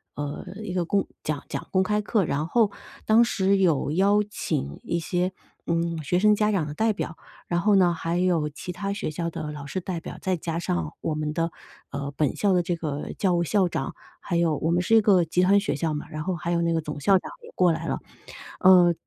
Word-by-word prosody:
呃， 145 Hz, +3 st, -5 dB, 0.2 s
一 195 Hz, -4 st, -5 dB
个 180 Hz, -2 st, 0 dB
公 195 Hz, +3 st, +1 dB, 0.2 s
讲 150 Hz, -2 st, -2 dB
讲 -, -, -5 dB
公 190 Hz, 0 st, +4 dB
开 210 Hz, +2 st, +1 dB
课。 210 Hz, -1 st, +1 dB
然 155 Hz, -1 st, -1 dB
后， 220 Hz, +2 st, +3 dB, 0.3 s
当 220 Hz, +2 st, +5 dB
时 200 Hz, -3 st, +2 dB
有 165 Hz, -7 st, +2 dB
邀 200 Hz, +5 st, +3 dB
请 70 Hz, -, -3 dB
一 170 Hz, -, -1 dB
些 180 Hz, +2 st, -1 dB, 0.4 s
嗯 170 Hz, -1 st, -1 dB
学 175 Hz, +6 st, +1 dB
生 210 Hz, +2 st, +5 dB
家 210 Hz, 0 st, +2 dB
长 180 Hz, -7 st, 0 dB
的 145 Hz, -, -5 dB
代 220 Hz, +7 st, +2 dB
表， 180 Hz, -5 st, -4 dB, 0.3 s
然 175 Hz, 0 st, 0 dB
后 210 Hz, +2 st, +4 dB
呢， 180 Hz, -2 st, +4 dB
还 165 Hz, +1 st, -2 dB
有 175 Hz, -4 st, +1 dB
其 180 Hz, +4 st, -7 dB
他 195 Hz, +3 st, -3 dB
学 200 Hz, -, -3 dB
校 170 Hz, +2 st, -3 dB
的 155 Hz, -2 st, -5 dB
老 145 Hz, -1 st, -7 dB
师 145 Hz, +7 st, -3 dB
代 180 Hz, -2 st, -4 dB
表， -, -, -8 dB
再 190 Hz, -1 st, 0 dB
加 165 Hz, 0 st, -3 dB
上 85 Hz, -, -2 dB
我 155 Hz, -, -2 dB
们 150 Hz, 0 st, -2 dB
的 165 Hz, +2 st, -1 dB, 0.4 s
呃 140 Hz, 0 st, -4 dB
本 150 Hz, -4 st, +1 dB
校 205 Hz, -, +2 dB
的 180 Hz, -1 st, +4 dB
这 175 Hz, 0 st, -1 dB
个 150 Hz, -3 st, -4 dB
教 190 Hz, -3 st, +2 dB
务 170 Hz, 0 st, +2 dB
校 190 Hz, +1 st, +2 dB
长， 135 Hz, -5 st, -3 dB, 0.2 s
还 175 Hz, -, -3 dB
有 170 Hz, -3 st, +2 dB
我 160 Hz, -, -1 dB
们 175 Hz, +1 st, +2 dB
是 185 Hz, -, 0 dB
一 -, -, +8 dB
个 200 Hz, -4 st, +4 dB
集 165 Hz, +2 st, +1 dB
团 195 Hz, +2 st, +5 dB
学 200 Hz, 0 st, 0 dB
校 160 Hz, -2 st, -1 dB
嘛， 150 Hz, -, -4 dB
然 155 Hz, -, -5 dB
后 185 Hz, +3 st, -2 dB
还 170 Hz, 0 st, -3 dB
有 170 Hz, -1 st, +1 dB
那 170 Hz, 0 st, +1 dB
个 165 Hz, -, +1 dB
总 150 Hz, -1 st, -6 dB
校 190 Hz, +7 st, +4 dB
长 -, -, -6 dB
也 -, -, -12 dB
过 180 Hz, -2 st, +4 dB
来 165 Hz, +1 st, -3 dB
了。 -, -, -1 dB, 0.6 s
呃， 180 Hz, -2 st, +7 dB
170 Hz, 260 characters per minute, -25 LUFS, 155-190 Hz, 0.6 s, 一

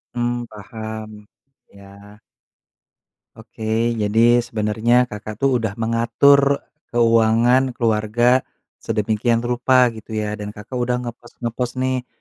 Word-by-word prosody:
Mmm, 120 Hz, 0 st, -2 dB
paham. 110 Hz, 0 st, -9 dB, 0.4 s
Iya. 100 Hz, +1 st, -16 dB, 1.2 s
Oke. 110 Hz, +1 st, -2 dB
Jadi 115 Hz, +3 st, +4 dB
sebenernya, 110 Hz, +2 st, +1 dB
Kakak, 105 Hz, -2 st, -7 dB
tuh, 135 Hz, -2 st, +3 dB
udah 110 Hz, -3 st, -3 dB
mengatur 120 Hz, +5 st, +3 dB, 0.3 s
keuangan 120 Hz, +2 st, +3 dB
keluarga 115 Hz, +3 st, +2 dB, 0.4 s
sedemikian 115 Hz, +2 st, 0 dB
rupa 125 Hz, +1 st, +3 dB
gitu, 110 Hz, -1 st, -9 dB
ya. 105 Hz, -1 st, -2 dB
Dan 105 Hz, 0 st, -7 dB
Kakak 115 Hz, +5 st, -7 dB
udah 125 Hz, 0 st, 0 dB
ngepos-ngepos, 120 Hz, +1 st, -5 dB
nih, 130 Hz, -1 st, -2 dB
115 Hz, 105 wpm, -20 LUFS, 110-120 Hz, 1.2 s, Jadi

